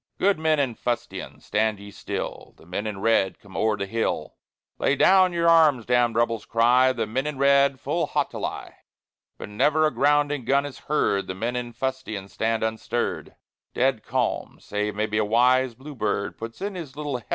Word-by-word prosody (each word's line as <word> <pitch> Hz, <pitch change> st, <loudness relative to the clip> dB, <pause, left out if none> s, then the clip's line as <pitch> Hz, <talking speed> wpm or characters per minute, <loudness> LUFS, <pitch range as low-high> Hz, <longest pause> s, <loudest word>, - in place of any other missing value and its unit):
Good 195 Hz, -3 st, +2 dB
men 160 Hz, -1 st, +2 dB
in 135 Hz, -4 st, 0 dB
fustian, 120 Hz, +1 st, -4 dB
stand 110 Hz, 0 st, 0 dB
ye 100 Hz, 0 st, -11 dB
still; -, -, -6 dB
The -, -, -18 dB
men 95 Hz, +5 st, -4 dB
in 100 Hz, -2 st, -5 dB
red 110 Hz, -4 st, +2 dB
come 100 Hz, -2 st, -16 dB
o'er 110 Hz, -1 st, +1 dB
the 100 Hz, -, -2 dB
hill. 115 Hz, +4 st, -2 dB, 0.4 s
Lay 140 Hz, -, +2 dB
down 185 Hz, +3 st, +5 dB
your 170 Hz, -1 st, +1 dB
arms, 155 Hz, -8 st, +5 dB
damned 120 Hz, -1 st, +2 dB
Rebels! 115 Hz, -2 st, 0 dB
cry 120 Hz, +3 st, +4 dB
The 130 Hz, -, -2 dB
men 130 Hz, +6 st, -2 dB
in 150 Hz, -2 st, -4 dB
red 140 Hz, -1 st, +4 dB
full -, -, -1 dB
haughtily. -, -, -3 dB, 0.7 s
But -, -, -8 dB
never 150 Hz, +9 st, +2 dB
a 155 Hz, -, +2 dB
grounding 145 Hz, -1 st, +2 dB
gun 140 Hz, +3 st, +2 dB
is 145 Hz, -, -8 dB
heard; 100 Hz, -9 st, +1 dB
The 95 Hz, -, -4 dB
men 115 Hz, +5 st, -2 dB
in 120 Hz, -1 st, -3 dB
fustian 120 Hz, -5 st, -4 dB
stand 110 Hz, +1 st, -1 dB
unstirred; 110 Hz, +2 st, -3 dB, 0.4 s
Dead 130 Hz, -3 st, +1 dB
calm, 125 Hz, -2 st, -2 dB
save 105 Hz, 0 st, -3 dB
maybe 105 Hz, 0 st, -1 dB
a -, -, +2 dB
wise 125 Hz, +3 st, +3 dB
bluebird 115 Hz, -7 st, -3 dB
Puts 115 Hz, +5 st, -8 dB
in 200 Hz, +1 st, -3 dB
his 160 Hz, -7 st, -8 dB
little 145 Hz, -3 st, -3 dB
heavenly 115 Hz, -, -15 dB
word. -, -, -37 dB
120 Hz, 185 wpm, -24 LUFS, 110-140 Hz, 0.7 s, down